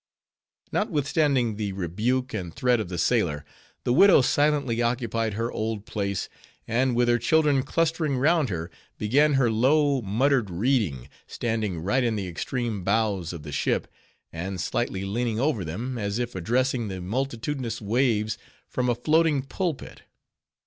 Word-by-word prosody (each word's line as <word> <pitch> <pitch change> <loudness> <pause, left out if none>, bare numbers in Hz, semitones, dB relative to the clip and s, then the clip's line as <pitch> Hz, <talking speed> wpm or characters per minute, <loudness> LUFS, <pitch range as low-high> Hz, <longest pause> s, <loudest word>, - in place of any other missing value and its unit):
Notwithstanding 140 - +1
the 105 -2 -2
rebuke 110 +8 -1
and 90 -6 -4
threat 125 +5 +1
of 105 - -4
the 90 - -4
sailor, 85 - +1 0.4
the 120 - +1
widow 195 +1 +7
silently 145 -5 +2
occupied 115 -3 -1
her 115 +2 -2
old 110 -1 -3
place; 100 -4 -2 0.4
and 125 +2 +1
with 120 0 +3
her 120 0 +3
children 145 +2 +3
clustering 155 0 0
round 155 +1 +3
her, 85 -3 -4 0.3
began 145 +8 +3
her 125 -4 +3
low, 140 +4 +3
muttered 120 +2 +1
reading, 95 - 0 0.2
standing 110 -7 -2
right 105 +9 +1
in 115 -2 +1
the 100 -3 -3
extreme 110 +3 -3
bows 100 -4 0
of 85 -4 -8
the 75 - -7
ship, 70 - 0 0.5
and 90 +3 -4
slightly 95 +2 -2
leaning 115 +2 -1
over 130 -7 +1
them, 115 +10 -4
as 100 0 -2
if 120 0 -3
addressing 120 +5 0
the 95 -2 -5
multitudinous 120 +3 -3
waves 110 0 0 0.3
from 125 -1 -1
a 120 - +2
floating 155 +2 +2
pulpit. 165 +2 -4
115 Hz, 150 wpm, -26 LUFS, 100-135 Hz, 0.5 s, widow